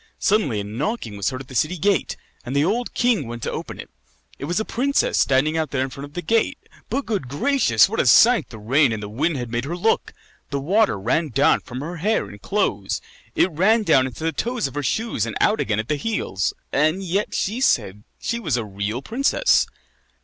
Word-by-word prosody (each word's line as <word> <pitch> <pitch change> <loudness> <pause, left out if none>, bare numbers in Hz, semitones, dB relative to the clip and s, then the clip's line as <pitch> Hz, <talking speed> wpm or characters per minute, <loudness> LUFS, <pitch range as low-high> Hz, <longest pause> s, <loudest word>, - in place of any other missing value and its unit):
Suddenly 195 - +1
a - - -5
knocking 115 - -3
was 100 -1 -1
heard 130 -1 -6
at 135 - -12
the 130 - -11
city 155 +9 0
gate, 195 +1 0 0.3
and 130 +2 -5
the 145 +2 +3
old 235 +7 -1
king 235 - +1
went 120 0 -7
to - - -2
open - - -6
it. - - -8 0.5
It - - -4
was 175 +6 0
a 220 - -2
princess 275 +4 +1
standing 145 +4 +2
out 160 -1 -1
there 130 -2 0
in 135 - -4
front 140 +2 -7
of 145 - -16
the 175 - -4
gate. 225 +7 +1 0.3
But, 280 - -1
good 200 - -2
gracious! 140 - +3
what - - -3
a - - +2
sight 230 - +6
the 115 - -10
rain 130 +6 +3
and 105 -1 -5
the - - -5
wind 145 +9 -1
had 120 -2 -5
made 120 +2 -2
her 170 +5 -4
look. 225 +5 +1 0.4
The 140 - -2
water 185 - +2
ran 130 - 0
down 135 +3 +3
from 125 +1 -8
her 170 +4 -5
hair 210 +7 +1
and 100 -1 -12
clothes; 105 - -1 0.4
it 185 - +3
ran 210 +8 +3
down 130 -9 +4
into 130 +5 -8
the 165 - +1
toes 235 - -2
of 135 - -4
her 145 - -2
shoes 145 - -1
and 110 - -4
out 215 - +3
again 105 - 0
at 110 - -3
the 150 - 0
heels. 140 - -1 0.2
And 155 +7 +1
yet 190 +3 -1
she 220 +6 -1
said 105 - +2
that 105 - -19
she 235 - -1
was 155 - -1
a 115 - -2
real 100 +5 -4
princess. 275 - +2
145 Hz, 230 wpm, -22 LUFS, -, 0.5 s, sight